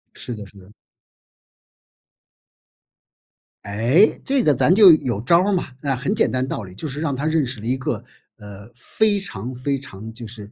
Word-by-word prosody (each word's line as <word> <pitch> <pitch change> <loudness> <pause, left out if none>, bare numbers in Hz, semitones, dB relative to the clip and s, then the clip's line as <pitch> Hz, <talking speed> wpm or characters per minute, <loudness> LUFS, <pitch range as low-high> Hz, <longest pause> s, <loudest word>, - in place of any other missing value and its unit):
是 120 - -6
的 105 -2 -8
是 100 - -19
的。 95 +1 -16 2.9
诶， 120 - +2
这 270 -2 +1
个 150 - +4
咱 150 +6 +3
就 200 -4 +9
有 125 -9 +1
招 170 +8 +4
儿 205 - 0
嘛。 185 -3 -1
啊， 140 -2 -1
很 130 +11 -2
简 220 - +2
单 130 0 -1
的 130 - -4
道 115 - -4
理， 95 -2 -12
就 155 - -6
是 145 +2 -5
让 145 -4 -1
他 140 +3 -4
认 160 -1 +1
识 125 -3 -4
了 110 - -9
一 125 +3 0
个， 125 -1 -2 0.4
呃， 100 0 -12
非 205 - 0
常 125 - -5
非 140 +3 -2
常， 110 -5 -9
就 115 0 -8
是 105 -2 -10
130 Hz, 205 characters per minute, -21 LUFS, 110-160 Hz, 2.9 s, 就